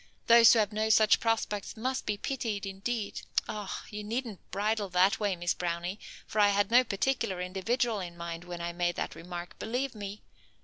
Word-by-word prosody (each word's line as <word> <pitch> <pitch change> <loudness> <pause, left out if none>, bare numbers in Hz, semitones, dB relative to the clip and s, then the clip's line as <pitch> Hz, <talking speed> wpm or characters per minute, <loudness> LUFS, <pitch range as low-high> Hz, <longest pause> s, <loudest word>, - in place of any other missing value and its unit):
Those 230 -1 +8
who - - +5
have 215 -1 +2
no 215 +1 0
such 215 0 +5
prospects 225 -2 -1
are 255 +4 -1
to - - -3
be 210 -1 -1
pitied 220 -4 -3
indeed. 200 +3 -3 0.3
Ah! 210 -2 -5
you 210 0 -5
needn't 225 -1 -3
bridle 205 +1 -1
that 185 +4 +3
way, 205 -3 0
Miss 175 0 0
Brownie, 175 +3 -3 0.3
for 215 - 0
I 205 - +7
had 205 +1 +2
no 250 +2 +7
particular 230 -2 -1
individual 210 +5 0
in 175 -2 -7
mind 170 0 -5
when 175 -1 -6
I 170 0 -3
made 175 0 0
that - - -3
remark, 175 +1 -8
believe 250 +4 -2
me. 205 -1 -7
205 Hz, 190 wpm, -30 LUFS, 180-225 Hz, 0.3 s, Those